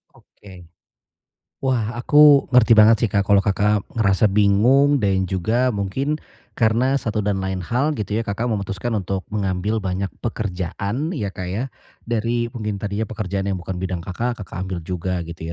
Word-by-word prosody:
Oke. 90 -4 -16 1.0
Wah, 120 -4 0
aku 145 +2 +6
ngerti 120 -2 +6
banget 110 +1 +7
sih, 115 - +3
Kak, 100 -1 +1
kalau 100 -1 +5
Kakak 105 0 +1 0.2
ngerasa 100 0 +3
bingung 120 +8 +4
dan 95 -1 +2
juga 110 +8 0
mungkin 105 +10 -1 0.4
karena 120 +4 +2
satu 110 -3 -2
dan 100 -1 0
lain 95 -1 -3
hal 135 - 0
gitu 105 -2 -2
ya 115 - -3
Kakak 110 +4 -2
memutuskan 100 +2 -3
untuk 95 0 -3
mengambil 100 +1 -1
banyak 95 0 -3
pekerjaan 105 - -3
ya, 105 - -3
Kak, 90 -3 -5
ya. 105 +7 -2 0.4
Dari 120 +1 -1
mungkin 105 -4 -4
tadinya 105 +2 -2
pekerjaan 100 -3 -3
yang 100 - 0
bukan 90 0 -5
bidang 90 -2 -3
Kakak, 115 +6 -3
Kakak 95 0 -6
ambil 95 -1 -4
juga 90 +1 -3
gitu 80 0 -7
105 Hz, 160 wpm, -21 LUFS, 95-115 Hz, 1.0 s, banget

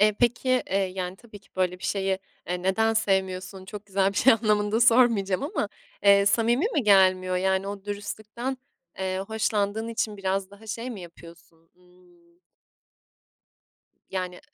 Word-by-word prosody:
Eee, 210 +1 +5
peki, 250 +2 +2
eee, 195 - +1
yani, 185 -1 -3
tabii 220 -2 -14
ki 200 - -27
böyle 180 -1 0
bir - - -11
şeyi, 195 -1 0 0.3
eee, 180 0 -2
"Neden 220 +4 +2
sevmiyorsun? 190 -2 -1
Çok 205 +1 -9
güzel 195 0 +1
bir - - -11
şey" 265 - +6
anlamında 215 0 +1
sormayacağım 230 -5 +4
ama, 310 +8 -2 0.3
eee, 200 0 +6
samimi 235 - +3
mi 285 - +2
gelmiyor? 185 -3 +4
Yani, 190 +1 0
o 200 -1 -7
dürüstlükten, 215 +5 -5 0.4
eee, 190 0 -2
hoşlandığın 220 0 -1
için 220 -2 -2
biraz 195 0 -2
daha 205 +2 -15
şey 230 +4 -4
mi 215 -5 -7
yapıyorsun? 170 -1 -15
Imm 180 -1 -25 1.8
yani, 185 -1 -4
200 Hz, 150 wpm, -26 LUFS, 185-220 Hz, 1.8 s, şey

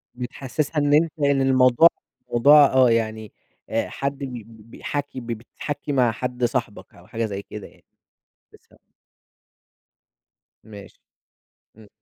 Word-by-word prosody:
بتحسسها 135 +5 -4
إن 145 0 +2
أنت 160 +1 +3
إن 140 -1 +2
الموضوع 130 +3 +5 0.4
موضوع 145 +5 +7
آه، 130 -2 +5
يعني 110 -2 -2 0.4
آآ، 115 - -1
حد 140 0 -4
بي 140 - -5 0.2
بي 110 -1 -17
بيحَكي 140 +4 -6
ب 120 - -11
بتحَكي 130 +6 -6
مع 125 -4 +2
حد 125 +1 -5
صاحبك 120 -4 -4
أو - - -18
حاجة 115 0 -3
زي 100 -2 -5
كده 105 0 -10
يعني، - - -24 0.7
بالضبط. - - -24 1.7
ماشي. 105 -2 -13 0.8
امم. 110 -2 -17
125 Hz, 130 wpm, -23 LUFS, 115-140 Hz, 1.7 s, موضوع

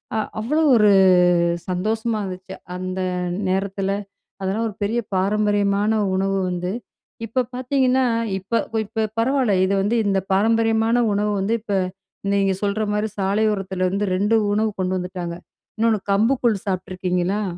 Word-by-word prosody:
அ - - +1 0.2
அவ்வளோ 285 +9 0
ஒரு 210 -2 +5 0.8
சந்தோஷமா 220 +5 -1
இருந்துச்சு. 185 -1 -7 0.2
அந்த 185 +1 -4 0.5
நேரத்தில, 195 +1 -1 0.5
அதெல்லாம் 195 +4 -1
ஒரு 205 - -8
பெரிய 220 +4 +1 0.2
பாரம்பரியமான 205 +2 +1 0.2
உணவு 195 +1 0
வந்து 180 +1 -3 0.5
இப்ப 245 +2 -1
பார்த்தீங்கன்னா 260 0 +2 0.3
இப்ப 200 +5 -1 0.3
இப்ப 220 +2 -2
பரவால்ல 255 -2 +2
இது 195 +1 +1
வந்து 215 +4 +1
இந்த 195 -1 +2
பாரம்பரியமான 225 +3 +2 0.2
உணவு 210 +1 0
வந்து 200 +4 -1
இப்ப 210 -2 -3 0.6
நீங்க 195 -1 +2
சொல்ற 205 +2 0
மாரி 210 +1 0
சாலையோரத்திலருந்து 195 -1 0
2 205 +4 +1 0.2
உணவு 215 +1 +1
கொண்டு 185 0 0
வந்துட்டாங்க. 180 -1 -5 0.4
இன்னொன்னு 225 -2 +2
கம்பு 225 +7 +3
கூழ் 215 -5 +1
சாப்பிட்ருக்கீங்களா? 185 +1 -1
205 Hz, 125 wpm, -22 LUFS, 190-225 Hz, 0.8 s, ஒரு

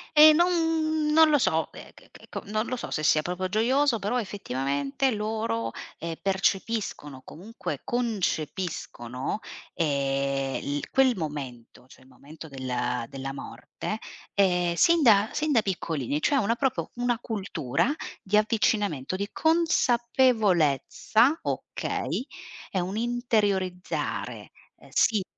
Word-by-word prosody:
E 305 +1 +10
non 325 -2 +2
non 320 0 +7
lo 295 - +5
so, - - +1
eh - - -11
che - - -19
che - - -16
ecco, - - -7
non 215 +2 -1
lo 255 - -2
so, - - -6
se 155 - -2
sia 155 +1 +4
proprio 180 +1 -2
gioioso, 245 +5 +2
però 210 +5 0
effettivamente, 140 - -1
loro, 210 - -2 0.3
ehm, 165 0 -4
percepiscono, 195 -7 -1
comunque, 210 +9 -7
concepiscono, 180 - -2 0.4
ehm, 140 -2 -1
l - - -3
quel 260 -3 +4
momento, 130 -6 -6
cioè 130 - -18
il - - -21
momento 150 +5 -12
del 125 -3 -2
della 135 0 -5
morte, 210 +8 -6 0.4
ehm, 180 -3 +3
sin 335 - +4
da 215 -2 +5
sin 305 0 0
da 230 - +4
piccolini, 155 - -2
cioè 285 - +2
una 230 0 +1
proprio 265 +1 -1
una 245 0 0
cultura 185 - -1 0.3
di 205 +2 0
avvicinamento, 210 - +1
di 200 +2 -3
consapevolezza, 240 - +2
okay, 260 - -3 0.5
è 190 - 0
un'interiorizzare, 205 -3 -1 0.3
ehm, - - -18
sì.. 210 -4 +3
200 Hz, 125 wpm, -27 LUFS, 145-240 Hz, 0.5 s, E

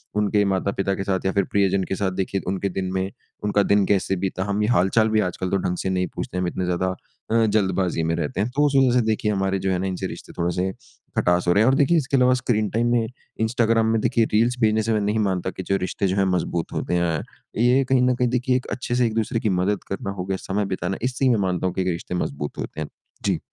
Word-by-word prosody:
उनके 105 0 +2
माता-पिता 95 +1 -1
के 95 - -3
साथ 95 -1 -1
या 95 - +2
फ़िर 100 0 +2
प्रियजन 100 -1 +2
के 95 - -3
साथ 95 -1 -1
देखिए 95 +1 -2
उनके 95 +1 -1
दिन 95 -1 -2
में 95 +1 -1 0.3
उनका 105 0 +2
दिन 100 0 +3
कैसे 95 -1 +1
बीता? 95 0 -2
हम 100 +1 -1
ये 105 - +1
हाल-चाल 110 +2 +3
भी 110 - +2
आजकल 90 0 -2
तो 100 - +1
ढंग 90 -1 -2
से 95 - -2
नहीं 90 -1 0
पूछते 90 - -4
हैं। - - 0
हम 90 - 0
इतने 90 +1 -2
ज़्यादा 90 +1 0 0.4
अ, 115 0 +4
जल्दबाज़ी 95 -5 +1
में 80 - 0
रहते 80 +3 -3
हैं 110 - 0
तो 145 +1 +4
उसे 140 -1 +3
वजह 130 -2 +4
से - - +3
देखिए 110 -1 0
हमारे 95 -1 0
जो 95 0 -1
हैं 90 - 0
ना 95 - -1
इनसे 90 -1 -3
रिश्ते - - -9
थोड़े 85 +1 0
से 95 +1 0 0.5
खटास 90 0 +2
हो 90 - +5
रहे 105 - +4
हैं। 115 - +5
और 135 - +3
देखिए 145 +5 +3
इसके 140 -2 +1
अलावा 125 0 +5
स्क्रीन 115 -4 0
टाइम 115 +2 0
में 115 -2 +2 0.3
इंस्टाग्राम 115 0 +2
में 115 - +2
देखिए 115 -1 +2
रील्स 120 +3 +3
भेजने 110 0 +3
से 115 0 0
मैं 105 - +1
नहीं 105 +2 0
मानता 95 -3 0
कि 95 - -7
जो 100 - +3
रिश्ते 100 - -1
जो 95 - 0
हैं 95 - +3
मज़बूत 85 -2 -2
होते - - -2
हैं। 85 -3 +1 0.4
ये 125 +3 +4
कहीं 130 -1 +4
ना 125 0 +3
कहीं 125 0 +1
देखिए 125 +1 +1
एक 130 - -6
अच्छे 120 -1 -2
से 125 -1 +3
एक-दसरे 115 0 0
की 110 - 0
मदद 100 +1 0
करना 95 0 -3
हो 90 - -2
गए 95 0 -2
समय 100 +2 -2
बिताना 95 +2 -3
इसी 130 +2 +1
में 120 - +3
मानता 95 -1 0
हूँ 90 - -2
कि 95 - 0
एक 95 - -1
रिश्ते 90 +1 -3
मज़बूत 75 -3 -3
होते - - -6
हैं। 75 - -3 0.4
जी। - - +1
100 Hz, 265 wpm, -23 LUFS, 95-115 Hz, 0.5 s, हो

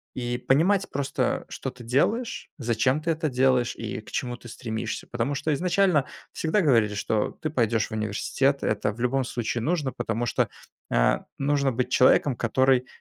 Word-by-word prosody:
и 120 -1 -2
понимать 180 +11 +2
просто, 140 0 -1
что 135 - -4
ты 125 -2 -13
делаешь, 180 - 0
зачем 120 +3 +1
ты 165 - 0
это 160 -1 -1
делаешь 130 -1 +2
и 110 -2 -5
к - - -15
чему 120 -1 -3
ты 120 - -13
стремишься. 110 -1 -5
Потому 120 +4 -2
что 150 +2 0
изначально 180 -2 +2 0.3
всегда 165 +6 +1
говорили, 115 - +3
что 105 +1 0
ты 155 - -1
пойдёшь 115 -5 +1
в - - -22
университет. 110 +6 0
Это 105 0 0
в 115 - -15
любом 130 +2 +1
случае 120 -1 -2
нужно, 150 -4 0
потому 115 +2 -2
что, 120 - 0 0.4
а, - - +2
нужно 140 -1 +1
быть 125 +1 -1
человеком, 130 +1 +4
который 130 +2 +2
130 Hz, 170 wpm, -26 LUFS, 115-145 Hz, 0.4 s, человеком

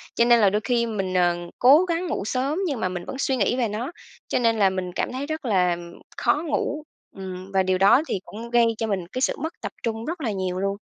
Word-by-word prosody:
cho 235 - +4
nên 240 0 +6
là 205 -3 +5
đôi 210 +2 0
khi 240 -1 +1
mình, 195 -5 -3
ờ, 175 -1 +3 0.2
cố 285 +8 +7
gắng 345 0 -1
ngủ 290 - -2
sớm 270 - -1
nhưng 280 -7 -2
mà 185 - 0
mình 180 -1 -5
vẫn - - -6
suy 270 -1 +1
nghĩ 205 +2 +1
về 245 -3 +1
nó, 220 +7 -4 0.4
cho - - 0
nên 230 -2 +2
là 195 -2 +5
mình 185 -1 -3
cảm - - -2
thấy 265 +2 -3
rất 310 -2 -4
là 180 -6 +2 0.4
khó 290 +6 +1
ngủ. 300 0 -1 0.3
Ừm, 190 0 -7
và 190 0 +3
điều 185 0 +1
đó 195 +8 +6
thì - - -1
cũng 230 +3 -8
gây 240 -1 +5
cho 225 - -2
mình 190 -4 -2
cái 255 +8 -5
sự - - +2
mất 320 +2 -4
tập - - -4
trung 225 -1 -3
rất 330 +3 -4
là 230 -6 -1
nhiều 185 -2 -2
luôn. 195 +1 -1
225 Hz, 260 wpm, -24 LUFS, 190-260 Hz, 0.4 s, cố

